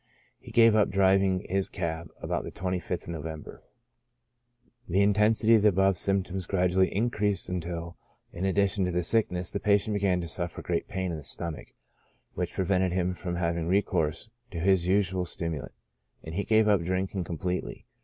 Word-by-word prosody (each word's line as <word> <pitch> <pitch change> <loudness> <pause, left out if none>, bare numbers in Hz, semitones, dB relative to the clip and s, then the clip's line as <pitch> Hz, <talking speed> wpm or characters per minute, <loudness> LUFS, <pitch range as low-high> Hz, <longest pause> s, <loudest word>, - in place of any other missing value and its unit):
He - - -13
gave 115 -1 +5
up 105 -1 +3
driving 95 -1 +2
his 95 +1 0
cab 85 -2 -4
about - - -2
the - - -7
25th 90 -1 -3
November. 80 -2 -7 1.3
The 95 +4 +3
intensity 105 +2 +4
of 110 - +6
the 105 - +5
above 95 0 +3
symptoms 95 -1 -1
gradually 90 0 +2
increased 105 -2 -1
until, 85 -1 -4 0.4
in 85 - -5
addition 100 0 +1
to 90 - -1
the 90 0 0
sickness, 90 -3 +1
the 100 - -2
patient 105 +1 +2
began 95 -3 +1
to 85 - -4
suffer 85 +1 -3
great - - -2
pain 95 -2 -3
in 80 - -4
the 75 - -9
stomach, 85 +2 -3 0.7
which 90 -1 -3
prevented 95 -1 +1
him 90 0 0
from 90 -1 -5
having 85 -1 -1
recourse 90 0 0 0.2
to - - -7
his 90 0 +2
usual 95 -1 +1
stimulant, 85 -7 -4 0.5
and 80 - -7
he 100 +4 -2
gave 110 -1 +4
up 100 -4 +4
drinking 95 +2 -2
com 85 -1 -5
pletely. 90 +3 -3
95 Hz, 170 wpm, -28 LUFS, 85-100 Hz, 1.3 s, of